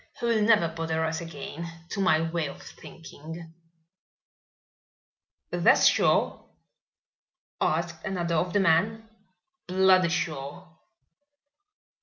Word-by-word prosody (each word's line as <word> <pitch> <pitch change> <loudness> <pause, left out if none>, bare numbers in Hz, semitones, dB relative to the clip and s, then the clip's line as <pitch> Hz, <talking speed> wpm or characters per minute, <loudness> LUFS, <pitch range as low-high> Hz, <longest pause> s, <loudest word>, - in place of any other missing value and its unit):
He - - -3
will 230 -2 +2
never 210 -5 +4
bother 160 0 -2
us 160 +1 -3
again, 165 +1 -7 0.2
to 200 - -5
my 160 -4 +3
way 165 -1 -2
of - - -9
thinking." 165 +1 -11 2.0
"That's - - +4
sure?" - - +2 1.2
asked 165 +1 -1
another 175 -4 -2
of 175 +2 0
the 205 - +2
men. 205 +6 +1 0.6
"Bloody 185 -1 +4
sure." 155 -1 -4
170 Hz, 100 wpm, -27 LUFS, 160-185 Hz, 2.0 s, never